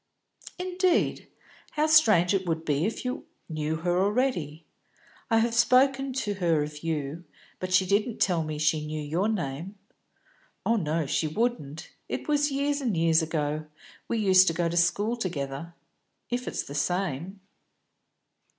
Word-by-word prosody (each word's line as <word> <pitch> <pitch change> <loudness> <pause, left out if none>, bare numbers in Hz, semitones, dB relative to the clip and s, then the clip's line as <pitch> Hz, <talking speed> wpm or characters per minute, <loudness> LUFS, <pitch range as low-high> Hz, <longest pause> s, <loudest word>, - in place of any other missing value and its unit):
"Indeed? 365 0 0 0.5
How 305 0 +2
strange 215 - +5
it 190 -2 0
would 165 -1 -2
be 150 +4 +1
if 225 - -5
you 250 - -4 0.2
knew 155 -1 -2
her 175 +2 0
already. 195 - 0 0.6
I 225 - +4
have 230 +1 +2
spoken 265 +3 +3
to 215 -6 -2
her 165 -4 +2
of 150 0 -7
you, 160 0 -3 0.4
but 185 0 -4
she 185 +1 +4
didn't 210 +4 +1
tell 175 -4 +2
me 155 -1 -4
she 155 0 +1
knew 155 0 -4
your 165 +8 -1
name." 175 -1 -3 0.9
"Oh 230 - +3
no, 160 -3 -1
she 150 +3 0
wouldn't. 160 - -2 0.2
It - - -4
was 295 -1 +2
years 285 +1 0
and 230 -9 -1
years 165 0 +4
ago. 155 -1 -2 0.4
We 230 - -1
used 190 -3 +5
to 165 - +3
go 170 +1 0
to 170 - -3
school 200 +7 +2
together 165 -4 -4 0.6
if 245 +1 -2
it's - - -2
the 140 - -9
same." 175 +3 -2
175 Hz, 155 wpm, -27 LUFS, 155-230 Hz, 0.9 s, strange